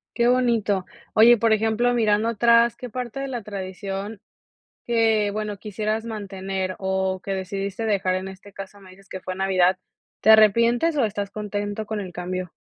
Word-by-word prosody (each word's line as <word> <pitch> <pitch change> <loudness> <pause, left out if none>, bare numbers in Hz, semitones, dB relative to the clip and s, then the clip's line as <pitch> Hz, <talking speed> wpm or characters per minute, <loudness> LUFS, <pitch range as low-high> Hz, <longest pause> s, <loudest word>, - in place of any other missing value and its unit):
Qué 235 - +2
bonito. 230 -6 +2 0.3
Oye, 235 +2 +7
por 225 0 +2
ejemplo, 225 +3 +2
mirando 220 -1 +2
atrás, 235 +1 +4
qué 245 0 -8
parte 250 +1 -5
de 275 - -3
la 240 -4 -4
tradición, 195 +1 -6 0.7
que 225 -3 +2
bueno, 210 0 -4
quisieras 215 +2 -3
mantener 195 -3 -4
o 190 -1 -1
que 195 - -3
decidiste 195 +3 -4
dejar, 195 -3 +1
en 190 +1 -4
este 190 +1 -12
caso 195 +1 -10
me 190 - -15
dices 195 +2 -18
que 190 - -7
fue 185 0 -5
Navidad, 185 -1 +2 0.4
¿te 220 - +4
arrepientes 235 +8 +5
o 270 - +3
estás 205 -1 -3
contento 205 0 -4
con 215 -1 -3
el 185 -3 -7
cambio? 180 0 -5
205 Hz, 170 wpm, -23 LUFS, 190-225 Hz, 0.7 s, Oye